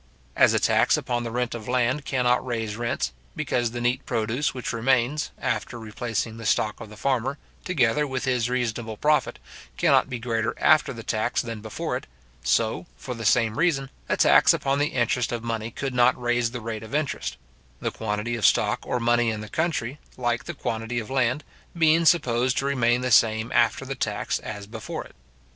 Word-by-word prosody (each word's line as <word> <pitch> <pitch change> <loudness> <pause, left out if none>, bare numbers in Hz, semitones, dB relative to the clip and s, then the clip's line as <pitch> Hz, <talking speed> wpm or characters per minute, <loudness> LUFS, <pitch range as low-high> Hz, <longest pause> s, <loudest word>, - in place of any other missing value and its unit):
As - - +5
a - - +3
tax - - +3
upon 120 -1 -2
the 115 - -3
rent 125 +1 -2
of 115 -3 -7
land 130 +3 +1
cannot 125 -2 +2
raise 115 -4 -3
rents, 115 - -2 0.2
because 120 -1 0
the 120 +1 -5
neat 120 +3 0
produce 120 +4 -1
which 125 -2 -4
remains, 130 +5 +1
after 115 +1 -2
replacing 110 0 -3
the 115 - -8
stock 105 0 +1
of 110 - -8
the 105 - -12
farmer, 135 +2 0 0.3
together 150 -3 +2
with 130 -1 -3
his 125 -2 +1
reasonable 120 -3 -2
profit, 150 +4 +1 0.4
cannot - - +3
be 125 - -3
greater 115 -2 -1
after 155 0 +4
the 115 -3 -8
tax 110 +3 0
than 115 -3 -6
before 110 0 -4
it, - - -5 0.4
so, 110 - +1
for 125 - -6
the 115 -2 -6
same 115 +2 +3
reason, 140 -6 +1 0.2
a - - +1
tax - - +6
upon 135 +1 0
the 145 - +2
interest 120 -2 0
of 120 -1 -3
money 115 -1 -3
could 135 +3 -4
not 125 +1 +4
raise 120 -1 +1
the 120 0 -6
rate 110 -1 -4
of 110 +5 -6
interest; 155 -1 -2 0.4
the - - -2
quantity 110 +2 -2
of 115 - -5
stock - - +3
or 125 - -2
money 120 0 +2
in 110 -1 -3
the 110 - -8
country, 150 -4 -2 0.2
like 120 -1 -1
the 170 - -6
quantity 115 -1 -3
of 115 +1 -4
land, 130 +2 +1 0.3
being 165 0 +4
supposed 130 -6 +3
to 135 - 0
remain 125 -3 +2
the 130 0 -1
same 110 +1 +4
after 120 +3 +2
the 135 - -3
tax 105 -6 -2
as 105 -1 -7
before 110 +1 -6
it. - - -17
120 Hz, 195 wpm, -25 LUFS, 115-130 Hz, 0.4 s, tax